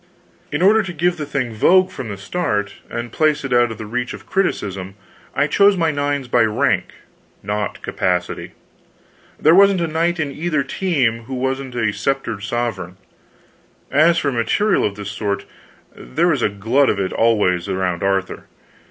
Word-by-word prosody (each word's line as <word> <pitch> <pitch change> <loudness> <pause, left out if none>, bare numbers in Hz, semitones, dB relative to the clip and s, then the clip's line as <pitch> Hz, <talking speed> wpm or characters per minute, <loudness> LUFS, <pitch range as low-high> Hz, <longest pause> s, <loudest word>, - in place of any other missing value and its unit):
In 150 +4 0
order 215 +3 +6
to 190 -4 -6
give 175 +2 0
the 150 -2 -5
thing 130 -5 -2
vogue 185 - +4
from 125 -9 -6
the 100 - -5
start, 105 - -2 0.2
and 120 0 -5
place 155 +1 +1
it 130 - -2
out 120 0 +4
of 110 - -7
the 110 - -7
reach 125 +3 -3
of - - -14
criticism, 100 - -2 0.4
I - - +3
chose 200 -1 +4
my 165 -2 +2
nines 145 -2 -2
by 120 0 +3
rank, 110 -1 +2 0.6
not 105 0 -3
capacity. 90 -1 -2 0.9
There 155 - +5
wasn't 195 0 +6
a 170 - +1
knight 165 +2 0
in 150 -3 -1
either 155 0 -1
team 130 -11 0
who 130 +2 -5
wasn't 130 0 -3
a 110 -4 0
sceptered 135 -6 -2
sovereign. 105 -5 -3 0.9
As 155 +5 +4
for 145 -4 0
material 130 - +1
of 100 - -2
this 105 0 -6
sort, 100 -1 -3 0.5
there 170 +6 0
was 145 -7 +1
a - - +2
glut 115 +8 +2
of - - 0
it 95 -1 -2
always 100 -6 +2
around 95 -2 -1
Arthur. 95 -1 -1
125 Hz, 170 wpm, -20 LUFS, 105-160 Hz, 0.9 s, order